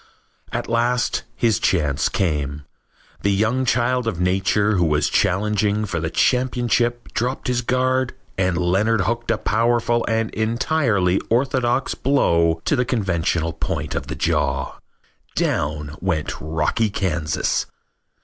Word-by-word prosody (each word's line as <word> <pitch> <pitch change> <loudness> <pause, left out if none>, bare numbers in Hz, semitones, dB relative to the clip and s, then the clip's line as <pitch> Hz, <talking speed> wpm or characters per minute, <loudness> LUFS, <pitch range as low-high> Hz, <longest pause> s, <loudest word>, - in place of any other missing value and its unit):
At - - -3
last 120 0 0
his 115 -5 +2
chance 70 -2 +1
came. 75 -5 -1 0.6
The 100 - +1
young 110 +6 +1
child 125 0 +1
of 90 -7 -2
nature 95 +3 +2
who 90 - +3
was 75 -2 +2
challenging 105 +2 +1
for 85 -4 -3
the 80 0 -2
championship 120 0 +1
dropped 125 +3 -2
his 125 -1 +1
guard 130 +1 0 0.2
and 95 -2 0
Leonard 95 +5 +2
hooked 115 +5 -2
a 115 - +2
powerful 120 +2 +1
and 115 0 0
entirely 110 - +1
orthodox 130 +1 +1
blow 85 -12 +2
to - - +2
the 125 - +2
conventional 85 -8 0
point 80 -2 -3
of - - -3
the - - -4
jaw. - - -1 0.6
Down 75 0 -1
went 85 -5 -1
Rocky 80 +8 0
Kansas. 80 -7 -1
105 Hz, 130 wpm, -21 LUFS, 85-120 Hz, 0.6 s, who